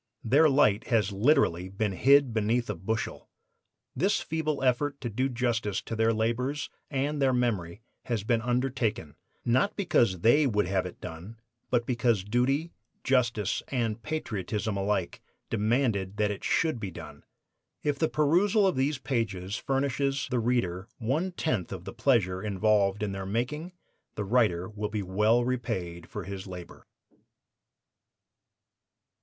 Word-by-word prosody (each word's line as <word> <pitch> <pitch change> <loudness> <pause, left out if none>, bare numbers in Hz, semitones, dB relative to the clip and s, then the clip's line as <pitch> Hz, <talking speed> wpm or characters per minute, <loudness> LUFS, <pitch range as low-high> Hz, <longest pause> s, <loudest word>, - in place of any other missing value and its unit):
Their 145 +7 +5
light 115 -7 +3
has 110 -4 +1
literally 100 - +2
been 100 +2 -1
hid 135 +5 +4
beneath 115 +1 +1
a - - -4
bushel. 110 +7 -4 0.7
This - - +2
feeble 155 -3 -2
effort 140 +3 +1
to 120 -3 -3
do 130 +5 0
justice 115 -5 -1
to 115 - -5
their 110 +1 +3
labors 120 +6 -1 0.2
and 145 +1 -1
their 135 -1 +3
memory 110 -6 -1 0.2
has 115 -5 -1
been 115 +1 +1
undertaken, 120 - -1 0.3
not 130 - +2
because 120 - +2
they 140 - +5
would 105 -5 +1
have 95 0 0
it 90 - -12
done, 90 +6 -8 0.3
but 120 -1 +1
because 120 -5 +1
duty, 130 - 0 0.3
justice 120 -6 +1
and 115 -4 -1
patriotism 110 -8 -3
alike 100 -2 -1 0.3
demanded 110 -3 0
that 105 -1 +1
it 100 - -6
should 160 -7 +1
be 100 - -4
done. - - -10 0.6
If 145 -1 0
the 160 - +2
perusal 185 +8 +3
of 190 - +2
these 135 +2 +1
pages 110 -8 -2
furnishes 135 +1 -1
the 125 - +1
reader 110 -6 0
one 145 +11 -1
tenth 125 - -2
of - - -6
the - - -7
pleasure 95 -9 +2
involved 105 0 +1
in 105 - -1
their 95 0 -5
making, 150 - -2 0.4
the 105 - -3
writer 95 -6 +2
will 105 0 -4
be 105 -2 -3
well 105 +6 +2
repaid 95 -9 -3
for - - -5
his 95 0 -7
labor. 90 -2 -10
115 Hz, 145 wpm, -28 LUFS, 100-135 Hz, 0.7 s, Their